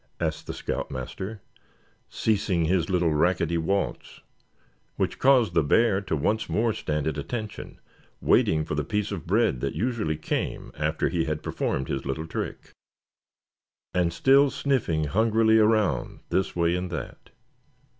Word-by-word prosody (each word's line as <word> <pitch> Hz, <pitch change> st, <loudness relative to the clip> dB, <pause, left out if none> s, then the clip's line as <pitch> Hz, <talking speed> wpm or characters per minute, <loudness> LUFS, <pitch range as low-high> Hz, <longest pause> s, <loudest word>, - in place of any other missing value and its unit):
asked 80 Hz, -1 st, -2 dB
the -, -, -4 dB
scout -, -, -3 dB
master, 95 Hz, -, -6 dB, 0.7 s
ceasing 100 Hz, -6 st, 0 dB
his 85 Hz, -1 st, +1 dB
little 90 Hz, -4 st, +2 dB
racketty 85 Hz, +1 st, +1 dB
waltz; 95 Hz, +5 st, -2 dB, 0.7 s
which -, -, -2 dB
caused 130 Hz, -4 st, +4 dB
the 80 Hz, -, +4 dB
bear 100 Hz, +6 st, +3 dB
to 95 Hz, -5 st, -2 dB
once 105 Hz, +9 st, 0 dB
more 115 Hz, 0 st, +1 dB
stand 75 Hz, -5 st, -2 dB
at 80 Hz, -2 st, -1 dB
attention, 110 Hz, -, -6 dB, 0.4 s
waiting 80 Hz, -1 st, +3 dB
for -, -, -4 dB
the 75 Hz, 0 st, 0 dB
piece 105 Hz, 0 st, -2 dB
of 90 Hz, -6 st, -5 dB
bread 105 Hz, -, +2 dB
that 70 Hz, -, -2 dB
usually 110 Hz, -10 st, -1 dB
came 75 Hz, -, -3 dB
after 75 Hz, +1 st, 0 dB
he 85 Hz, -1 st, 0 dB
had 75 Hz, -1 st, -3 dB
performed 65 Hz, -, -2 dB
his 70 Hz, -, -3 dB
little 70 Hz, +4 st, -3 dB
trick; 80 Hz, -, -5 dB, 1.2 s
and 90 Hz, -2 st, +2 dB
still 135 Hz, -, +5 dB
sniffing 125 Hz, -, 0 dB
hungrily 110 Hz, +6 st, +3 dB
around 105 Hz, -, +1 dB
this 95 Hz, +1 st, 0 dB
way 85 Hz, 0 st, +2 dB
and 90 Hz, 0 st, -3 dB
that. 85 Hz, -3 st, -7 dB
90 Hz, 145 wpm, -26 LUFS, 80-110 Hz, 1.2 s, still